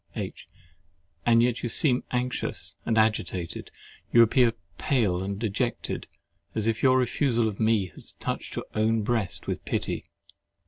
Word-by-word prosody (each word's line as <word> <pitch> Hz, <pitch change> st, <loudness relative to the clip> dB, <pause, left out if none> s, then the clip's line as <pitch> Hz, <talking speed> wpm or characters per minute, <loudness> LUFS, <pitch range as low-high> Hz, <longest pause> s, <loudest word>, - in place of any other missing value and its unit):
H. -, -, -5 dB, 0.8 s
And 115 Hz, 0 st, +6 dB
yet 120 Hz, -1 st, +1 dB
you 120 Hz, -, -2 dB
seem 125 Hz, +1 st, +2 dB
anxious 125 Hz, 0 st, -2 dB
and 115 Hz, -, +2 dB
agitated. 95 Hz, -5 st, 0 dB, 0.4 s
You 115 Hz, -, +8 dB
appear 115 Hz, +1 st, +4 dB, 0.3 s
pale 105 Hz, -10 st, +1 dB
and 100 Hz, +1 st, -3 dB
dejected, 115 Hz, +3 st, -2 dB, 0.5 s
as 110 Hz, -, 0 dB
if 115 Hz, -1 st, 0 dB
your 130 Hz, -1 st, +5 dB
refusal 125 Hz, -2 st, +2 dB
of 105 Hz, -2 st, -4 dB
me 110 Hz, -4 st, +2 dB
had -, -, -14 dB, 0.2 s
touched -, -, -3 dB
your -, -, -3 dB
own 110 Hz, 0 st, +2 dB
breast 110 Hz, -5 st, 0 dB
with -, -, -3 dB
pity. -, -, -2 dB
115 Hz, 145 wpm, -27 LUFS, 105-125 Hz, 0.8 s, You